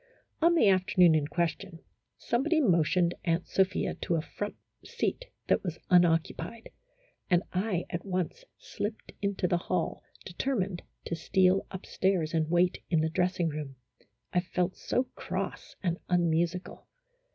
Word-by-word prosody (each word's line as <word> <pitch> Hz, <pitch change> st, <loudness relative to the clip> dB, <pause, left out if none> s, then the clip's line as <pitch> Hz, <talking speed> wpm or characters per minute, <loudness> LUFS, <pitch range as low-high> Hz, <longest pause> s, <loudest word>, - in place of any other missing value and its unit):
On 340 Hz, +1 st, +5 dB
the 270 Hz, -10 st, +5 dB
afternoon 185 Hz, -3 st, +5 dB
in 150 Hz, -2 st, +2 dB
question, 170 Hz, +2 st, -2 dB, 0.4 s
somebody 310 Hz, +7 st, +1 dB
motioned 175 Hz, -, +3 dB
Aunt 170 Hz, 0 st, 0 dB
Sophia 190 Hz, -1 st, +1 dB
to 170 Hz, -, 0 dB
a 160 Hz, -, +1 dB
front 205 Hz, +5 st, -5 dB, 0.3 s
seat -, -, -2 dB, 0.2 s
that -, -, +2 dB
was 175 Hz, -3 st, -3 dB
unoccupied, 175 Hz, +6 st, +2 dB, 0.6 s
and 175 Hz, -1 st, +4 dB
I 185 Hz, -2 st, 0 dB
at 170 Hz, -, -3 dB
once 185 Hz, -, -3 dB
slipped 210 Hz, +1 st, -5 dB
into 200 Hz, -2 st, 0 dB
the 175 Hz, 0 st, +1 dB
hall, 175 Hz, -1 st, -2 dB, 0.2 s
determined 190 Hz, -2 st, -2 dB, 0.2 s
to -, -, -3 dB
steal 185 Hz, +3 st, +2 dB
up 190 Hz, -, -7 dB
stairs 185 Hz, -4 st, 0 dB
and 160 Hz, -1 st, +1 dB
wait 175 Hz, +1 st, +2 dB
in 165 Hz, -3 st, +3 dB
the 160 Hz, -, +1 dB
dressing 180 Hz, +1 st, +1 dB
room, 145 Hz, -3 st, -5 dB, 0.6 s
I 180 Hz, -, +4 dB
felt 180 Hz, +1 st, -1 dB
so 250 Hz, -, 0 dB
cross -, -, -5 dB
and 175 Hz, -2 st, 0 dB
unmusical. 175 Hz, 0 st, 0 dB
180 Hz, 140 wpm, -29 LUFS, 170-190 Hz, 0.6 s, On